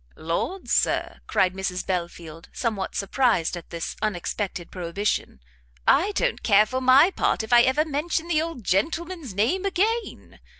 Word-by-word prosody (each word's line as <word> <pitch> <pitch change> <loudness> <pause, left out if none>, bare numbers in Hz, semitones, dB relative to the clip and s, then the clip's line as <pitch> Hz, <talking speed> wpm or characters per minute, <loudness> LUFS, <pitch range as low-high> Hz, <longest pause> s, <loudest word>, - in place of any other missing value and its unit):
"Lord, 170 - -3
Sir," - - 0
cried 185 -1 +2
Mrs 190 -1 -3
Belfield, 170 -3 -5
somewhat 215 -6 -3
surprised 200 -4 +1
at 175 - -9
this 170 -1 -5
unexpected 190 -2 -3
prohibition, 180 - -2 0.5
"I 390 +6 +4
don't - - 0
care 210 -1 +5
for 255 +4 -3
my 265 +8 +6
part 285 - 0
if 220 - -3
I 240 - +8
never 280 +4 +2
mention 320 +3 -2
the 315 -3 +2
old 325 -7 -5
gentleman's 310 - -2
name 255 - +1
again! 420 +4 -2
225 Hz, 145 wpm, -24 LUFS, -, 0.5 s, I